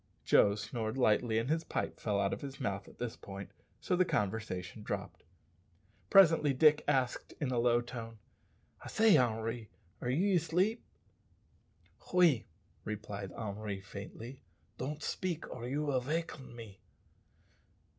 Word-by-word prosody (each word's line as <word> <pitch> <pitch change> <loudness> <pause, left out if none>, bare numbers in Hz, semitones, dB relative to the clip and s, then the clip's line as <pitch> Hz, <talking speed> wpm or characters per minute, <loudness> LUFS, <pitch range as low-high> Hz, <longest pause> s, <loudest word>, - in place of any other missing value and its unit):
Joe 100 0 +5
snored 110 +2 -3
lightly, 110 -2 +3
and 115 +2 0
his 160 +3 +1
pipe - - -3
fell 105 -2 0
out 100 -1 +1
of - - -5
his 135 -1 -7
mouth 100 0 -2
at - - -15
this 120 -2 -4
point, 100 -1 -9 0.3
so 180 - 0
the 185 - +4
conversation 105 - -2
dropped. - - -5 0.9
Presently 165 -7 +6
Dick 150 +2 +5
asked 130 -2 0
in 140 -4 -1
a 120 - +1
low 120 0 +4
tone, 115 -2 -7 0.7
"I - - -8
say, 220 -4 +5
Henri, 115 -3 0 0.3
are 120 - -2
ye 185 +10 +2
asleep?" 180 +8 +1 1.3
"Oui," 165 -10 +5 0.4
replied 105 -2 -5
Henry 105 -2 -4
faintly. 105 +6 -9 0.4
"Don't 145 +4 -4
speak, 175 -4 -2
or 120 -1 -6
you 145 +4 -1
vill 135 -3 +1
vaken 150 -2 -4
me." 110 -5 -10
120 Hz, 140 wpm, -33 LUFS, 110-150 Hz, 1.3 s, Presently